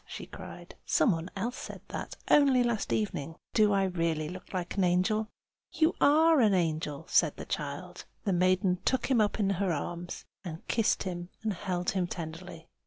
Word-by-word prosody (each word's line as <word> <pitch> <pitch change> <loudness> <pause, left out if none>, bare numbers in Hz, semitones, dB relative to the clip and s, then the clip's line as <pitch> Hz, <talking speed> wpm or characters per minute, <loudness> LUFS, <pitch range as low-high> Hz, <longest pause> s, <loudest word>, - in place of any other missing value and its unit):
she - - -7
cried. - - -10
"Some 240 - +3
one 165 0 -3
else 235 +6 -3
said - - -8
that, - - -5
only 275 -4 +5
last 235 -3 -1
evening. 165 -7 -2 0.2
Do 215 -2 +4
I 195 -1 +3
really 165 -4 -1
look 180 +1 -9
like 180 -2 -3
an 195 - +2
angel?" 185 +5 +2 0.5
"You 320 +1 +3
are 315 +2 +6
an 210 -4 +4
angel!" 160 -3 -1
said 160 -4 +3
the - - -6
child. 150 +5 -5 0.2
The 195 - +1
maiden 185 0 +2
took 260 +1 +1
him 240 -4 +5
up 210 +1 0
in 200 -2 +2
her 195 -1 0
arms 175 +3 -4 0.2
and 165 -3 -8
kissed 225 -2 +2
him, 175 -1 -5
and 215 -2 0
held 180 -1 -2
him 185 -2 0
tenderly. 165 0 -7
185 Hz, 180 wpm, -30 LUFS, 170-215 Hz, 0.5 s, are